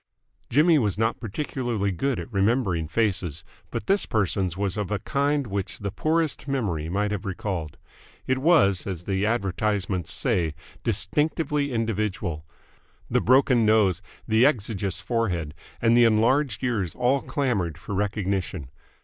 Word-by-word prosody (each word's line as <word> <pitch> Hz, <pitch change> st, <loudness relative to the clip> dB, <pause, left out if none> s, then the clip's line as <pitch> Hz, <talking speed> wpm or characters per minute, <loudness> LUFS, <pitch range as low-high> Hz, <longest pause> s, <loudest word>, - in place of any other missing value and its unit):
Jimmy 155 Hz, +4 st, +5 dB
was 105 Hz, -6 st, 0 dB
not 115 Hz, +1 st, 0 dB
particularly 115 Hz, -3 st, -2 dB
good 135 Hz, +8 st, -1 dB
at 120 Hz, -, -8 dB
remembering 100 Hz, -5 st, +1 dB
faces, 90 Hz, -5 st, -1 dB, 0.3 s
but -, -, -4 dB
this 195 Hz, +1 st, +2 dB
person's 95 Hz, -4 st, 0 dB
was 100 Hz, -2 st, -1 dB
of 105 Hz, -3 st, -3 dB
a 105 Hz, -, 0 dB
kind 140 Hz, +6 st, 0 dB
which 100 Hz, -3 st, -3 dB
the 100 Hz, -1 st, -4 dB
poorest 160 Hz, -, 0 dB
memory 100 Hz, -, -1 dB
might 105 Hz, +3 st, 0 dB
have 100 Hz, -3 st, -3 dB
recalled. 95 Hz, -5 st, -4 dB, 0.5 s
It 130 Hz, 0 st, 0 dB
was, 130 Hz, -, +3 dB
as 90 Hz, -3 st, -4 dB
the 95 Hz, +2 st, 0 dB
advertisements 100 Hz, -4 st, -1 dB
say, 80 Hz, -3 st, +1 dB, 0.3 s
distinctively 150 Hz, -2 st, 0 dB
individual. 105 Hz, -9 st, -2 dB, 0.6 s
The -, -, +3 dB
broken 130 Hz, -1 st, +4 dB
nose, 105 Hz, -5 st, +3 dB, 0.3 s
the 110 Hz, +1 st, +4 dB
exiguous 105 Hz, -, +1 dB
forehead, 90 Hz, -11 st, -1 dB, 0.3 s
and 115 Hz, 0 st, +5 dB
the 120 Hz, 0 st, +6 dB
enlarged 115 Hz, +2 st, +2 dB
ears 105 Hz, -9 st, -1 dB
all 130 Hz, +3 st, +2 dB
clamoured 105 Hz, -, -1 dB
for -, -, -7 dB
recognition. 100 Hz, -7 st, -2 dB
105 Hz, 140 wpm, -25 LUFS, 95-125 Hz, 0.6 s, the